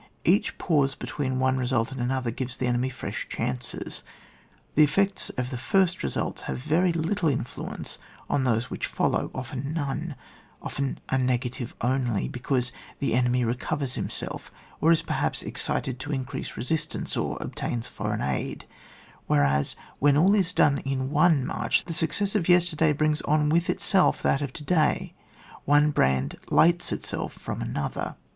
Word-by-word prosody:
Each -, -, +3 dB
pause 145 Hz, -5 st, +2 dB
between 130 Hz, -3 st, -3 dB
one 130 Hz, 0 st, +2 dB
re 125 Hz, -1 st, -1 dB
sult 120 Hz, -2 st, +1 dB
and 135 Hz, -2 st, -5 dB
another 125 Hz, -1 st, 0 dB
gives 130 Hz, +2 st, -4 dB
the 130 Hz, -, -1 dB
enemy 125 Hz, +1 st, +1 dB
fresh 130 Hz, -, -5 dB
chances: 65 Hz, -, -3 dB, 0.7 s
the 155 Hz, -, +6 dB
effects 195 Hz, +6 st, +1 dB
of 125 Hz, +1 st, -2 dB
the 125 Hz, -, -4 dB
first 185 Hz, +6 st, +2 dB
results 70 Hz, -, -2 dB
have 65 Hz, -, -2 dB
very 170 Hz, -, +2 dB
little 165 Hz, +1 st, +1 dB
influence 125 Hz, -3 st, -4 dB, 0.3 s
on 135 Hz, -, +1 dB
those 120 Hz, -1 st, +1 dB
which -, -, -2 dB
follow, -, -, 0 dB
often 130 Hz, +3 st, -4 dB
none, 155 Hz, 0 st, -2 dB, 0.4 s
often 140 Hz, -1 st, -3 dB
a 130 Hz, -, +2 dB
negative 125 Hz, 0 st, -1 dB
only, 125 Hz, -3 st, +1 dB
because 125 Hz, 0 st, -1 dB, 0.3 s
the 140 Hz, -, 0 dB
enemy 125 Hz, 0 st, +2 dB
recovers 130 Hz, +3 st, -1 dB
himself, -, -, -4 dB, 0.3 s
or 165 Hz, -, +4 dB
is 165 Hz, 0 st, +3 dB
perhaps -, -, 0 dB
excited 130 Hz, -1 st, -2 dB
to 145 Hz, +3 st, -5 dB
increased 130 Hz, -3 st, -4 dB
resistance, 155 Hz, +7 st, -1 dB
or -, -, -1 dB
obtains 115 Hz, -1 st, -3 dB
foreign -, -, -3 dB
aid; 65 Hz, -2 st, -2 dB, 0.6 s
whereas, 70 Hz, -1 st, +2 dB, 0.2 s
when 145 Hz, 0 st, +5 dB
all 185 Hz, +6 st, +5 dB
is 190 Hz, -5 st, +2 dB
done 145 Hz, -5 st, +4 dB
in 135 Hz, 0 st, -2 dB
one 150 Hz, -3 st, +4 dB
march, -, -, 0 dB
the 170 Hz, -, -4 dB
success 195 Hz, +5 st, 0 dB
of 185 Hz, -5 st, 0 dB
yesterday 170 Hz, -3 st, +4 dB
brings 155 Hz, +1 st, +1 dB
on 150 Hz, 0 st, +2 dB
with 170 Hz, +3 st, +2 dB
itself 195 Hz, -1 st, +2 dB
that 140 Hz, -, +2 dB
of 140 Hz, -3 st, -2 dB
to 150 Hz, -, -8 dB
day, 155 Hz, -1 st, +1 dB, 0.5 s
one 145 Hz, +1 st, +5 dB
brand 65 Hz, -, +1 dB
lights 175 Hz, +2 st, +4 dB
itself -, -, -3 dB
from -, -, -5 dB
another. -, -, -3 dB
135 Hz, 160 wpm, -26 LUFS, 125-160 Hz, 0.7 s, the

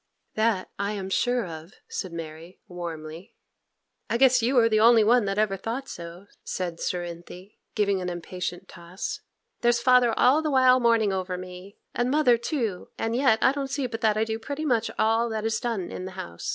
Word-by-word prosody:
'That 215 Hz, -4 st, +1 dB
I 200 Hz, +1 st, -1 dB
am 195 Hz, -2 st, -5 dB
sure 245 Hz, +1 st, +1 dB
of,' 165 Hz, +2 st, -9 dB
said 185 Hz, -, -5 dB
Mary, 165 Hz, +1 st, -9 dB
warmly. 170 Hz, 0 st, -8 dB, 0.7 s
'I 230 Hz, -, +1 dB
guess 255 Hz, -1 st, +5 dB
you 250 Hz, +3 st, +1 dB
are 230 Hz, -1 st, +6 dB
the 215 Hz, -1 st, +2 dB
only 230 Hz, 0 st, +6 dB
one 235 Hz, +1 st, +4 dB
that 195 Hz, 0 st, -2 dB
ever 210 Hz, -2 st, +1 dB
thought 235 Hz, +7 st, -4 dB
so,' 170 Hz, +3 st, -9 dB, 0.2 s
said 175 Hz, -3 st, -4 dB
Cerinthy, 175 Hz, +2 st, -6 dB, 0.2 s
giving 200 Hz, -3 st, +1 dB
an 180 Hz, -, -3 dB
impatient 180 Hz, +1 st, -5 dB
toss; 170 Hz, +2 st, -6 dB, 0.4 s
'there's 240 Hz, 0 st, +2 dB
father 250 Hz, -1 st, +4 dB
all 270 Hz, +5 st, +4 dB
the 310 Hz, -, -1 dB
while 255 Hz, -2 st, +5 dB
mourning 230 Hz, -4 st, +3 dB
over 185 Hz, -1 st, -3 dB
me, 185 Hz, +2 st, -10 dB, 0.2 s
and 245 Hz, +1 st, 0 dB
mother 285 Hz, -3 st, +4 dB
too, 230 Hz, -, -3 dB
and 225 Hz, +1 st, -2 dB
yet 250 Hz, -3 st, +4 dB
I 260 Hz, -, +6 dB
don't 275 Hz, -1 st, -4 dB
see 275 Hz, 0 st, -2 dB
but 230 Hz, -2 st, -5 dB
that 215 Hz, -1 st, +2 dB
I 215 Hz, -, +2 dB
do 225 Hz, 0 st, -3 dB
pretty 285 Hz, +6 st, -5 dB
much 235 Hz, -5 st, +1 dB
all 225 Hz, +2 st, +2 dB
that 220 Hz, -1 st, -3 dB
is 225 Hz, 0 st, 0 dB
done 230 Hz, -7 st, -3 dB
in 185 Hz, -, -6 dB
the 185 Hz, -, -7 dB
house. 85 Hz, -, -7 dB
215 Hz, 195 wpm, -26 LUFS, 180-240 Hz, 0.7 s, are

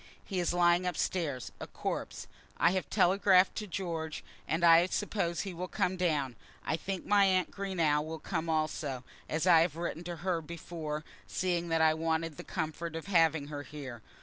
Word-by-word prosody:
He 190 Hz, -3 st, -2 dB
is 175 Hz, -, +1 dB
lying 175 Hz, +1 st, +3 dB
up 180 Hz, -, -2 dB
stairs, 140 Hz, -, -1 dB
a -, -, -6 dB
corpse. -, -, -4 dB, 0.3 s
I 170 Hz, -, +4 dB
have 185 Hz, -1 st, -2 dB
telegraphed 190 Hz, 0 st, +4 dB
to 210 Hz, -, -3 dB
George, 165 Hz, -4 st, -4 dB, 0.2 s
and 165 Hz, +2 st, 0 dB
I 170 Hz, +1 st, +7 dB
suppose 185 Hz, -4 st, -1 dB
he 195 Hz, -3 st, -5 dB
will 180 Hz, +2 st, -4 dB
come 180 Hz, 0 st, 0 dB
down. 150 Hz, -8 st, 0 dB, 0.3 s
I -, -, +1 dB
think 190 Hz, +2 st, -4 dB
my 205 Hz, -1 st, +5 dB
aunt 185 Hz, -2 st, +2 dB
Greenow 170 Hz, -7 st, +1 dB
will 160 Hz, +1 st, -5 dB
come 160 Hz, +1 st, -3 dB
also, 155 Hz, -4 st, -1 dB, 0.3 s
as 160 Hz, +2 st, 0 dB
I 175 Hz, -3 st, +7 dB
had 165 Hz, -2 st, +1 dB
written 170 Hz, 0 st, -4 dB
to 175 Hz, 0 st, -4 dB
her 175 Hz, -3 st, +1 dB
before, 155 Hz, -1 st, -5 dB, 0.2 s
seeing 175 Hz, -2 st, -1 dB
that 165 Hz, 0 st, +2 dB
I 160 Hz, 0 st, +5 dB
wanted 160 Hz, -1 st, -1 dB
the -, -, -7 dB
comfort 160 Hz, -1 st, -4 dB
of 165 Hz, -, -5 dB
having 160 Hz, -6 st, +3 dB
her 145 Hz, -1 st, -5 dB
here. 140 Hz, -6 st, -8 dB
170 Hz, 185 wpm, -31 LUFS, 155-180 Hz, 0.3 s, I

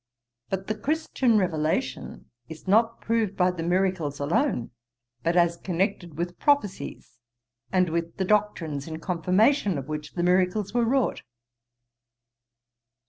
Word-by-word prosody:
But 190 Hz, 0 st, -2 dB
the 215 Hz, -, -1 dB
Christian 260 Hz, -1 st, +1 dB
revelation 160 Hz, -5 st, -2 dB, 0.2 s
is 160 Hz, +2 st, -10 dB
not 225 Hz, +4 st, +3 dB
proved 225 Hz, -3 st, 0 dB
by 180 Hz, 0 st, +3 dB
the 175 Hz, -2 st, -6 dB
miracles 175 Hz, -4 st, 0 dB
alone, 150 Hz, -, 0 dB, 0.5 s
but 170 Hz, +1 st, 0 dB
as 170 Hz, -1 st, +3 dB
connected 175 Hz, -3 st, -2 dB
with 175 Hz, +1 st, -4 dB
prophecies, 280 Hz, -, -1 dB, 0.5 s
and 185 Hz, -1 st, +3 dB
with 170 Hz, 0 st, -3 dB
the 190 Hz, -, 0 dB
doctrines 175 Hz, -9 st, 0 dB
in 160 Hz, 0 st, -6 dB
confirmation 190 Hz, -, +2 dB
of 135 Hz, -1 st, -5 dB
which 150 Hz, 0 st, -5 dB
the 175 Hz, -, -2 dB
miracles 185 Hz, +3 st, +2 dB
were 240 Hz, -1 st, +2 dB
wrought.' 260 Hz, +2 st, +1 dB
185 Hz, 130 wpm, -26 LUFS, 165-210 Hz, 0.5 s, not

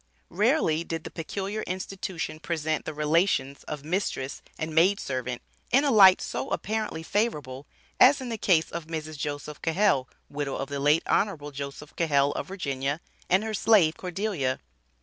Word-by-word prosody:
Rarely 195 Hz, -, +2 dB
did 165 Hz, -1 st, -4 dB
the -, -, -8 dB
peculiar 195 Hz, +6 st, -4 dB
institution 185 Hz, -3 st, -4 dB
present 155 Hz, -2 st, -2 dB
the -, -, -4 dB
relations 150 Hz, -2 st, +1 dB
of 150 Hz, -1 st, -6 dB
mistress 155 Hz, -6 st, -2 dB, 0.2 s
and 155 Hz, 0 st, -4 dB
maid 185 Hz, +6 st, +4 dB
servant 125 Hz, -2 st, -4 dB, 0.3 s
in 270 Hz, +3 st, +4 dB
a 285 Hz, -, +2 dB
light 195 Hz, -5 st, +8 dB
so -, -, -4 dB
apparently 215 Hz, -6 st, -2 dB
favorable 150 Hz, -, -2 dB, 0.3 s
as 275 Hz, +3 st, +7 dB
in 255 Hz, -2 st, -5 dB
the 230 Hz, -, -2 dB
case 170 Hz, -5 st, +3 dB
of 170 Hz, -1 st, -5 dB
Mrs. 155 Hz, -1 st, -5 dB
Joseph 145 Hz, 0 st, -5 dB
Cahell 165 Hz, -6 st, +2 dB, 0.2 s
(widow 145 Hz, -1 st, -3 dB
of 135 Hz, -, -4 dB
the 140 Hz, 0 st, -3 dB
late 150 Hz, +3 st, +3 dB
Hon. 155 Hz, -8 st, 0 dB
Jos 140 Hz, +1 st, -6 dB
Cahell, 145 Hz, -4 st, +2 dB
of -, -, -4 dB
Va.), 140 Hz, -6 st, -2 dB, 0.3 s
and 190 Hz, +3 st, +4 dB
her 220 Hz, 0 st, -3 dB
slave, 195 Hz, -7 st, +4 dB
Cordelia. 180 Hz, -8 st, -2 dB
160 Hz, 160 wpm, -27 LUFS, 145-195 Hz, 0.3 s, light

